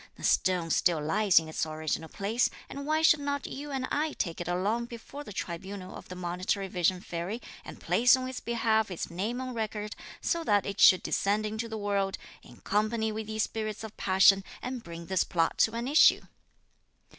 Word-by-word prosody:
The - - -14
stone 180 -3 +2
still 170 0 +3
lies 190 +6 +2
in 160 - +5
its 160 - -2
original 155 0 -3
place, 220 +5 0 0.2
and 280 +1 -7
why 310 +1 +1
should 315 -1 +6
not 285 -1 -2
you 290 +2 -6
and 265 -2 -2
I 305 +1 0
take 170 0 -3
it 175 - -5
along 200 +7 0
before 240 +5 -9
the 240 - -10
tribunal 185 +1 -6
of - - -11
the 180 - -7
Monitory 180 +2 -2
Vision 180 0 +1
Fairy, 175 +6 -4 0.2
and - - -10
place 245 +2 +4
on 255 0 -4
its 260 -1 -5
behalf 225 -2 +1
its 180 -2 -5
name 210 +8 -2
on 255 -1 -4
record, 215 -2 -4 0.2
so 335 0 -1
that 205 -9 +2
it 200 +1 -5
should 185 - +7
descend 205 +2 0
into 220 +2 -3
the 220 - -4
world, 200 -2 -1 0.2
in - - -16
company 220 +1 0
with 215 0 -5
these 220 0 0
spirits 215 -1 -4
of 220 -1 -8
passion, 195 +1 +5 0.2
and 250 -1 -5
bring 170 0 -8
this 190 +1 +1
plot 165 -2 0
to 220 - +4
an 235 +2 -3
issue?" 295 +3 +6
210 Hz, 200 wpm, -29 LUFS, 185-235 Hz, 0.2 s, should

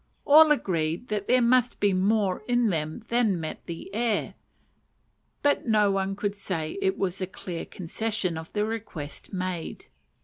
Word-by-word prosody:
All 310 +1 +8
agreed 170 - 0
that 210 -2 -2
there 250 0 +4
must 250 0 +3
be 205 -1 +3
more 195 +1 +1
in 240 -3 +2
them 155 +2 -3
than 230 -6 +2
met 160 -1 -6
the 170 -1 -6
ear; 230 -2 0 1.1
but 285 -3 +2
no 210 -2 +4
one 195 0 -1
could 205 0 -2
say 180 - -4
it 385 -1 +1
was 190 0 -2
a 185 - -1
clear 175 -2 -6
concession 190 0 -2
of 160 0 -7
the 210 0 +1
request 205 -10 -6
made. 185 -3 -4
200 Hz, 160 wpm, -27 LUFS, 180-230 Hz, 1.1 s, All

